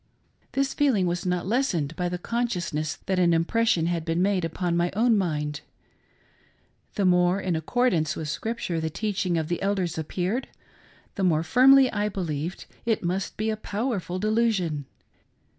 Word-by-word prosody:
This 275 0 0
feeling 255 -10 +2
was 175 +1 -2
not 180 -1 0
lessened 185 - 0
by 175 +2 -1
the 180 - -3
consciousness 175 -8 -2
that 190 -1 0
an 170 -2 +4
impression 175 +1 +2
had 170 -1 -1
been 165 +1 -1
made 190 -1 +2
upon 170 +1 -1
my 175 +1 +2
own 230 +2 +4
mind. 150 -6 -1 1.3
The 200 - +1
more 180 +1 +3
in 185 -3 -1
accordance 160 - +1
with 155 - -4
Scripture 180 +2 -3
the 160 - -1
teaching 185 0 -1
of 160 -1 -1
the 175 +1 -2
Elders 190 -5 -1
appeared, 185 - -2 0.7
the 195 - -3
more 160 -3 +3
firmly 260 +7 +6
I 210 0 0
believed 170 -3 -4 0.2
it 225 -4 0
must 185 +2 -2
be 220 +1 0
a - - -1
powerful 210 -4 -3
delusion. 205 -8 0
180 Hz, 160 wpm, -26 LUFS, 165-215 Hz, 1.3 s, firmly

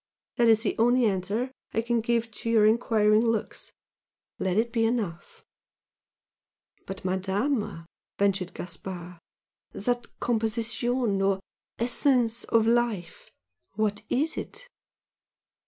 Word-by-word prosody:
that 235 -1 +5
is 225 0 +5
the - - 0
only 245 +2 +4
answer 205 +5 -1 0.2
I 225 - +1
can 235 0 +1
give 230 0 0
to 230 +2 -5
your 220 -2 +5
enquiring 215 -1 +4
looks! 225 -2 -2 0.7
let 190 0 0
it 230 +1 +1
be 230 - +2
enough!" 220 -8 -2 1.4
"But, 190 -1 -7
Madama" 195 +1 -1 0.3
ventured 195 -2 0
Gaspard 180 0 -7 0.5
"that 240 +3 -1
composition 230 -1 0
or 195 0 +2 0.4
essence 240 -1 +1
of 225 -1 +3
Life! 230 -7 0 0.5
what 210 -1 0
is 305 +5 0
it?" - - -6
225 Hz, 110 wpm, -27 LUFS, 195-235 Hz, 1.4 s, that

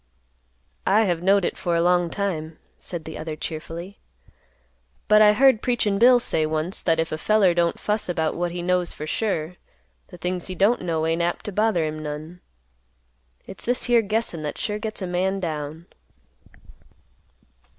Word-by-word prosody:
"I 210 +4 +5
have 175 -5 0
knowed 195 0 +3
it - - -3
for 175 -1 0
a 170 - +2
long 175 -1 +3
time," 165 -5 -3 0.2
said 170 -3 -7
the 160 - -7
other 155 0 -5
cheerfully; 165 +5 -6 1.1
"but 215 0 +6
I 210 0 +7
heard 260 -1 +4
'Preachin' 215 -5 +1
Bill' 245 +2 +7
say 160 -8 0
once, 155 +4 -2
that 165 -1 +1
if 160 0 -1
a 155 - -3
feller 205 -1 +3
don't 170 -1 +1
fuss 210 -2 -1
about 160 -3 0
what 175 0 -2
he 175 0 -5
knows 180 -1 0
for 150 - -7
sure, 175 -2 -2 0.5
the - - -12
things 180 +1 -3
he 185 - -5
don't 205 +7 +3
know 165 -3 -1
ain't 165 +1 0
apt 175 0 -2
to 210 - -4
bother 205 -4 +1
him 155 0 -4
none. 155 +4 -7 1.0
It's 195 - -10
this 245 +1 0
here 240 -1 +4
guessin' 215 -5 -1
that 150 -1 -4
sure 210 0 -2
gets 215 -2 -5
a - - -1
man 185 +2 -1
down." 155 -1 -5
180 Hz, 175 wpm, -24 LUFS, 160-205 Hz, 1.1 s, I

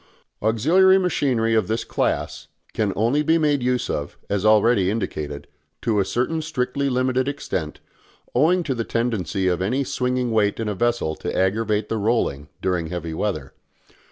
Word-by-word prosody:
Auxiliary 165 - +4
machinery 135 -11 +1
of 110 -4 +2
this 110 +1 -1
class - - -2 0.3
can 105 -3 0
only 120 +8 +2
be 160 +2 +3
made 150 -4 +2
use 125 0 0
of, 75 0 -4
as 100 -1 0
already 110 -2 +4
indicated, 75 -9 -3 0.4
to 110 -3 +1
a 100 - +2
certain 130 +10 -1
strictly 140 -3 -1
limited 130 0 +1
extent, 95 - -4 0.5
owing 170 +7 +3
to 140 - -1
the 115 -2 -2
tendency 110 -6 -1
of 90 -1 +1
any 125 +9 0
swinging 125 -1 -1
weight 105 -1 +1
in 115 - -2
a 105 - -1
vessel 120 -6 0
to - - -4
aggravate 105 +2 +1
the 110 - -2
rolling 100 - 0
during 90 -3 0
heavy 85 -1 -5
weather. 80 -6 -3
115 Hz, 160 wpm, -22 LUFS, 95-130 Hz, 0.5 s, Auxiliary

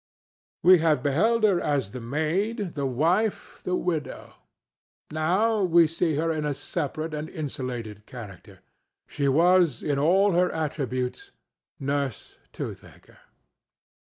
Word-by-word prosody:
We 180 +1 +8
have 160 -2 +2
beheld 215 +12 +2
her 200 -5 +4
as 135 -9 -1
the 125 - -7
maid, 170 - -1
the 140 -2 -2
wife, 170 - 0
the 180 - -1
widow; 165 -5 -3 0.8
now 190 +8 +1
we 170 -2 +5
see 165 0 0
her 165 +3 0
in 155 -1 -2
a 145 -1 -1
separate 155 +2 -4
and 150 +1 -4
insulated 125 -8 -6
character: 105 -8 -11 0.4
she 140 - -2
was 170 0 +3
in 145 -2 0
all 190 +7 +4
her 180 +1 +2
attributes 145 - -3 0.5
Nurse 140 -3 -3
Toothaker. - - -9
155 Hz, 125 wpm, -26 LUFS, 140-180 Hz, 0.8 s, We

